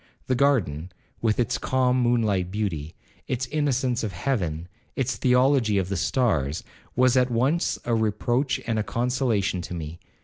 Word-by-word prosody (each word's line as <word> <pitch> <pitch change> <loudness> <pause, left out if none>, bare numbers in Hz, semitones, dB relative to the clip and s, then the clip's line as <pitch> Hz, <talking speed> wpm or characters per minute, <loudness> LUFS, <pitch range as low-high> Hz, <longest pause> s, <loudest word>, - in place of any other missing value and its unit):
The 130 - 0
garden, 100 - +1 0.3
with 110 0 +1
its 120 +1 0
calm 130 -1 +1
moon 120 -1 +2
light 95 -4 0
beauty, 90 -7 -3 0.3
its 130 0 -1
innocence 130 -4 0
of 105 -4 -3
heaven, 85 - -2 0.3
its 135 -1 -1
theology 125 -4 +3
of 95 -1 0
the 100 - -1
stars, 90 - 0 0.3
was 125 0 +4
at 125 0 +3
once 130 +8 +1
a 120 - 0
reproach 120 +4 0
and 115 -2 0
a - - 0
consolation 120 -6 0
to 90 - -6
me. 80 0 -6
115 Hz, 160 wpm, -25 LUFS, 95-130 Hz, 0.3 s, was